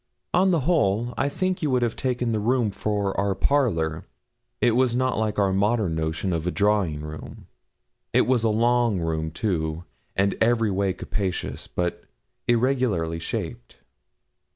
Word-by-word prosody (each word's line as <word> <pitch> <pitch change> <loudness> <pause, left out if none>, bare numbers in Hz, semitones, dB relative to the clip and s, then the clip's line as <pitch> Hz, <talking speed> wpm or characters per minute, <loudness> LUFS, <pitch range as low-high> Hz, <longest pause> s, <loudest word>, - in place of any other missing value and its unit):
On 190 +2 +4
the 170 -5 +2
whole, 120 - +1
I 140 - 0
think 185 +5 -1
you 155 - 0
would 125 -2 +2
have 115 -1 0
taken 125 -2 -1
the 110 - 0
room 115 0 +1
for 100 -1 -1
our 100 -1 +1
parlour. 85 - +1 0.6
It 120 - +4
was 125 -1 +2
not 130 -2 +1
like 110 -1 -1
our 100 -2 +2
modern 105 -2 +1
notion 80 +3 -1
of 85 +1 -2
a - - +3
drawing 100 -6 +1
room. 75 0 -9 0.7
It - - +4
was 125 -3 +2
a 115 - +3
long 115 -1 +2
room 80 -1 -1
too, 80 -2 -2 0.3
and 100 +1 +2
every 115 -2 +3
way 95 0 0
capacious, 95 -2 -3
but 90 -1 -2 0.4
irregularly 120 -10 +1
shaped. - - -5
105 Hz, 155 wpm, -25 LUFS, 85-120 Hz, 0.7 s, On